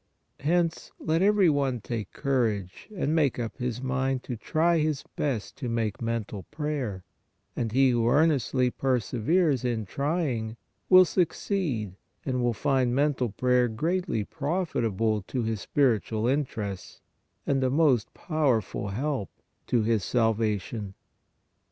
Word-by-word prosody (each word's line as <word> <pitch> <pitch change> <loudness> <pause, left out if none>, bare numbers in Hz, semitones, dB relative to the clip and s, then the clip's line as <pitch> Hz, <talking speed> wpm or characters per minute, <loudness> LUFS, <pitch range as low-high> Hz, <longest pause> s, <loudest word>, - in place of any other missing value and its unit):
Hence 165 +2 0
let 160 +2 0
every 200 -1 +4
one 140 -5 +1
take 105 -1 -5
courage 110 - -1
and 155 -3 0
make 150 -6 +2
up 115 -2 -4
his 125 -1 -3
mind 130 0 -1
to 125 - -4
try 165 +8 +1
his 150 -2 0
best 130 -8 -2
to 125 -4 -4
make 115 -2 -2
mental 115 -3 -3
prayer, 140 - -3 0.5
and 115 -2 -2
he 130 +2 +4
who 120 -1 +1
earnestly 135 -3 +2
perseveres 130 - +1
in 115 -3 -1
trying, 135 - -2 0.3
will 185 0 +9
succeed 160 - -1 0.3
and 125 -4 0
find 130 -4 +1
mental 140 -3 +1
prayer 125 +3 +2
greatly 160 - -1
profitable 115 - -1
to 125 -3 -2
his 110 -2 -2
spiritual 115 -5 +1
interests, 115 -9 -3 0.5
and 135 -1 +1
a 130 - +2
most 135 -6 +2
powerful 135 - 0
help 125 +1 -2 0.4
to 120 -3 +2
his 110 -3 +1
salvation. 110 -3 0
125 Hz, 125 wpm, -27 LUFS, 110-150 Hz, 0.5 s, will